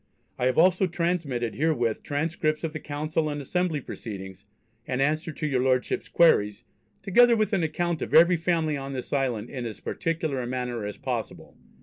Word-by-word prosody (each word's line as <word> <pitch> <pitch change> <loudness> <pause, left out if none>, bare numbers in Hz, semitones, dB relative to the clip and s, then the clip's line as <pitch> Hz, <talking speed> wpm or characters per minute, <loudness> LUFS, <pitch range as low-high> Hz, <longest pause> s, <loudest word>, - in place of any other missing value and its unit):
I 125 - +2
have 130 - 0
also 185 +3 +4
transmitted 165 -9 -1
herewith 125 -8 0
transcripts 155 +1 -1
of 160 -1 -3
the 155 - -4
Council 155 +2 -2
and 145 0 -3
Assembly 165 +1 -1
proceedings, 95 -4 -8 0.4
and 125 - -2
answers 155 +3 0
to 155 - -3
your 135 -4 +1
Lordships' 130 -1 0
queries, 105 -12 +3 0.4
together 235 +5 +5
with 215 0 0
an 195 - +2
account 165 +1 -1
of - - -4
every 170 +2 +7
family 165 -2 0
on 135 0 -5
this 130 +1 -5
island 130 -6 -1
in 130 -3 -5
as 110 - -8
particular 160 -5 -2
a 120 - -4
manner 125 -3 -3
as 105 - -6
possible.... - - -5
150 Hz, 180 wpm, -26 LUFS, 125-165 Hz, 0.4 s, every